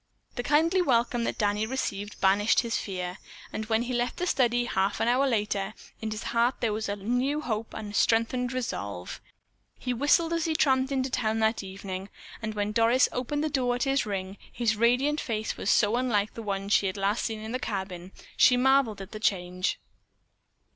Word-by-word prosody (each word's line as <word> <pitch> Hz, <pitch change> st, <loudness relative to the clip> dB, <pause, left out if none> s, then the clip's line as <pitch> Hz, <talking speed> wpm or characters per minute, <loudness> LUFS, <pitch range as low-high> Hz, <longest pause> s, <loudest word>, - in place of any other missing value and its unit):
The 245 Hz, -, -3 dB
kindly 320 Hz, +8 st, +3 dB
welcome 240 Hz, -5 st, +1 dB
that -, -, -2 dB
Danny 210 Hz, +1 st, +1 dB
received 205 Hz, -5 st, -3 dB
banished 200 Hz, +3 st, +4 dB
his 230 Hz, -1 st, -2 dB
fear, 180 Hz, -2 st, -4 dB, 0.3 s
and 215 Hz, 0 st, -4 dB
when 220 Hz, +1 st, +2 dB
he 250 Hz, +1 st, -4 dB
left 245 Hz, 0 st, -1 dB
the 360 Hz, -, -1 dB
study 245 Hz, -6 st, +2 dB
half 195 Hz, -3 st, 0 dB
an -, -, +1 dB
hour 255 Hz, +3 st, +3 dB
later, 210 Hz, -3 st, -1 dB, 0.3 s
in 220 Hz, -, -2 dB
his 215 Hz, 0 st, -5 dB
heart 235 Hz, +2 st, +3 dB
there 225 Hz, -3 st, 0 dB
was 215 Hz, 0 st, -3 dB
a 205 Hz, -, -1 dB
new 245 Hz, +8 st, 0 dB
hope 220 Hz, -5 st, -3 dB
and 210 Hz, -1 st, -6 dB
a -, -, -12 dB
strengthened 235 Hz, +3 st, +2 dB
resolve. 100 Hz, -, -4 dB, 0.6 s
He 250 Hz, -, -2 dB
whistled 295 Hz, +6 st, +3 dB
as 335 Hz, -1 st, 0 dB
he 320 Hz, -1 st, 0 dB
tramped 265 Hz, -3 st, +2 dB
into 265 Hz, -1 st, -1 dB
town 220 Hz, -3 st, 0 dB
that 220 Hz, +1 st, +2 dB
evening, 190 Hz, 0 st, -6 dB, 0.3 s
and 215 Hz, -1 st, -4 dB
when 205 Hz, 0 st, -1 dB
Doris 230 Hz, +4 st, +4 dB
opened 290 Hz, +4 st, -2 dB
the -, -, +1 dB
door 255 Hz, -4 st, +1 dB
at 245 Hz, -, -1 dB
his 270 Hz, -4 st, +1 dB
ring, 195 Hz, -1 st, -4 dB
his 230 Hz, -3 st, 0 dB
radiant 250 Hz, +7 st, +2 dB
face 220 Hz, -2 st, -2 dB
was -, -, -3 dB
so 210 Hz, +2 st, +4 dB
unlike 225 Hz, -5 st, 0 dB
the 230 Hz, -, -7 dB
one 200 Hz, -2 st, -3 dB
she 200 Hz, -1 st, +3 dB
had 190 Hz, -, -3 dB
last 200 Hz, +3 st, 0 dB
seen 225 Hz, -2 st, -2 dB
in 220 Hz, +1 st, -6 dB
the 255 Hz, -, -2 dB
cabin, 190 Hz, -5 st, -5 dB, 0.2 s
she 250 Hz, -, +6 dB
marveled 260 Hz, -5 st, +3 dB
at 195 Hz, -, -9 dB
the 215 Hz, -, -7 dB
change. 185 Hz, -3 st, 0 dB
225 Hz, 200 wpm, -28 LUFS, 205-255 Hz, 0.6 s, she